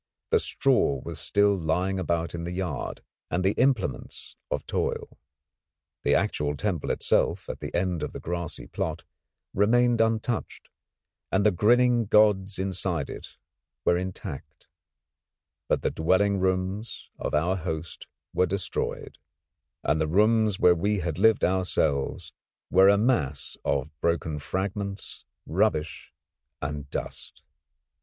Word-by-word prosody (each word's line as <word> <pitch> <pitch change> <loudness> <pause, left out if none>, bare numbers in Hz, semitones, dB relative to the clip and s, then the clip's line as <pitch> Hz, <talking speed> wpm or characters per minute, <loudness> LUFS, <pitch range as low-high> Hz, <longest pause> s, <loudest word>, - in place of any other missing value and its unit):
The - - +5
straw 70 -2 +2
was - - -6
still 100 0 +3
lying 90 +3 0
about 85 -1 -1
in 85 -1 -4
the 85 - -4
yard, 90 -5 -4 0.3
and 90 +2 0
the 95 - +4
implements 115 - -1
of - - -2
toil. - - -3 0.8
The - - +3
actual 75 0 0
temple 90 -1 -2
itself - - +1
at - - -5
the - - -6
end 90 -1 0
of - - -3
the - - -7
grassy 85 -1 -4
plot 80 0 -4 0.5
remained 120 +3 +3
untouched, 115 +1 -1 0.6
and 100 +2 +2
the 105 - +6
grinning 120 +5 +3
gods 105 -2 +4
inside 90 -5 -2
it - - -10 0.5
were 85 - +4
intact; 90 -4 -6 1.0
but - - 0
the - - +1
dwelling 95 +5 +2
rooms 95 +4 -2
of - - -2
our 85 +5 +1
host 80 -2 -5 0.3
were 90 - +2
destroyed, 95 +1 -3 0.6
and 75 +3 +1
the 80 - +1
rooms 105 +3 +3
where 90 - +6
we 100 +3 0
had 85 -1 -3
lived 110 +1 +4
ourselves 85 -7 0 0.4
were 95 +2 +7
a 100 - +5
mass 105 - 0
of 70 +1 -1
broken 80 -2 0
fragments, 100 +4 -4 0.2
rubbish, 75 0 0 0.5
and 70 0 -5
dust. - - -6
95 Hz, 130 wpm, -27 LUFS, 80-100 Hz, 1.0 s, were